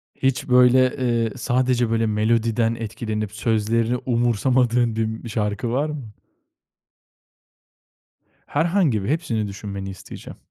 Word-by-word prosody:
Hiç, 135 -1 -1
böyle, 125 0 +5
eee, 120 -3 0
sadece 125 -1 +1
böyle 115 0 +1
melodiden 115 +1 +1
etkilenip 110 -2 -4
sözlerini 115 +2 0
umursamadığın 120 0 +2
bir 110 0 0
m 110 +2 -6
şarkı 105 +1 -2
var 145 +5 0
mı? 135 -8 -7 2.3
Herhangi 160 - +1
biri, 125 - -1
hepsini 115 -10 -1
düşünmeni 100 -1 -6
isteyeceğim. 95 -1 -10
115 Hz, 110 wpm, -22 LUFS, 110-125 Hz, 2.3 s, böyle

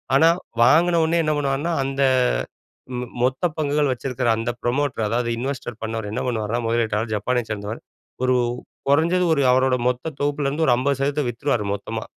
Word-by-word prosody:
ஆனா 160 +4 +6 0.3
வாங்குனோன்னயே 165 +4 +4
என்ன 155 -1 +1
பண்ணுவாங்கன்னா, 145 +4 -1
அந்த 135 0 -2 1.0
மொ 125 - -3 0.2
மொத்த 130 +7 +1
பங்குகள் 150 -2 +1
வச்சிருக்கிற 125 -1 -2
அந்த 115 +1 -2
ப்ரமோட்டர், 125 -2 0
அதாவது 120 +2 0
இன்வெஸ்ட் 125 -3 -4
பண்ணவர் 110 -2 -3
என்ன - - -2
பண்ணுவார்னா, 115 -1 -1
முதலீட்டாளர் 115 -1 0
ஜப்பானைச் 120 +3 -1
சேர்ந்தவர், 105 +1 -4 0.4
ஒரு 130 0 +3 0.5
குறைஞ்சது 165 +6 +3
ஒரு 140 - +1
அவரோட 130 0 +3
மொத்த 125 +5 -3
தொகுப்புல 145 0 0
இருந்து 155 +3 0
ஒரு 120 - +6
50% 135 +3 0
சதவீதத்த 140 0 0
வித்துருவாரு, 120 -2 -1
மொத்தமா. 110 +2 -5
130 Hz, 155 wpm, -22 LUFS, 115-145 Hz, 1.0 s, ஆனா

